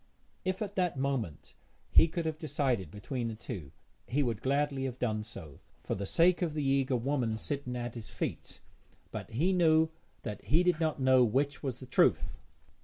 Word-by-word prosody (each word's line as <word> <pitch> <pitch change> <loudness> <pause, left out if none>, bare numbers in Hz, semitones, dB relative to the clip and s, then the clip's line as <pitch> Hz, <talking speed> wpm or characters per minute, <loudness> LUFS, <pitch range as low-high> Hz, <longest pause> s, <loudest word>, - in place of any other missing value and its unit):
If 185 +3 -1
at 205 -1 -5
that 180 -6 +1
moment 130 - -2 0.4
he - - +7
could 170 0 -3
have 155 -1 -2
decided 130 - 0
between 115 - -4
the 115 - -4
two 100 - -7 0.4
he 145 +3 +1
would 115 -4 -2
gladly 140 0 +1
have 125 -2 -4
done 110 -4 -1
so, 90 -9 -10 0.2
for - - -2
the 100 0 -3
sake 175 - +4
of 165 -4 -1
the 150 - 0
eager 135 -1 +2
woman 120 -3 0
sitting 130 0 -3
at 120 -1 -3
his 115 -3 -8
feet, - - -5 0.5
but - - -6
he 160 +12 +1
knew 160 -3 +4 0.3
that 105 -1 -6
he 165 +5 +4
did 180 -3 +2
not 155 -3 0
know 130 -1 +5
which 140 +5 +1
was 130 -3 -3
the 130 - -8
truth. 125 - +2
135 Hz, 185 wpm, -31 LUFS, 115-155 Hz, 0.5 s, he